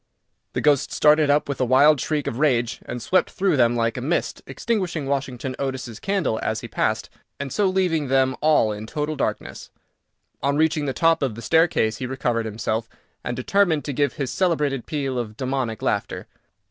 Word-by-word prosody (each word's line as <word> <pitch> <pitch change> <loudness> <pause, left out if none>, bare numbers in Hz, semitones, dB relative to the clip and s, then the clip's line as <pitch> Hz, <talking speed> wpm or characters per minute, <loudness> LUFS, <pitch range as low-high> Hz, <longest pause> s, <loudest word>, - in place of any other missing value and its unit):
The - - -1
ghost 145 -2 +2
started 150 0 +4
up 145 +1 +3
with 140 -2 -3
a - - +4
wild 135 +3 +5
shriek 150 0 -1
of 115 - -3
rage, 125 -5 +1
and 125 - -4
swept 180 +11 +1
through 195 -4 +1
them 120 -3 +3
like 115 0 0
a - - -3
mist, 160 +7 -1
extinguishing 185 -10 -2
Washington 135 -2 -3
Otis's 130 -4 -4
candle 190 - -1
as 110 0 -2
he - - -7
passed, - - -1 0.3
and 140 -2 -4
so 205 - +2
leaving 180 -6 +1
them 130 0 +2
all 150 -8 +3
in 105 +1 -6
total 150 +4 -3
darkness. - - -4 0.7
On 140 +2 +1
reaching 155 -1 +2
the 135 - -1
top 165 +5 +2
of 130 -6 -1
the 115 - -8
staircase 160 -8 +2
he 125 - -4
recovered 120 -3 -1
himself, 110 +1 -3 0.3
and 120 - -3
determined 165 +2 +1
to 145 - -3
give 140 0 +1
his 135 -4 -3
celebrated 150 -7 0
peal 135 -4 -2
of 110 -2 -6
demoniac 130 -4 -2
laughter. - - -2
135 Hz, 185 wpm, -23 LUFS, 120-155 Hz, 0.7 s, wild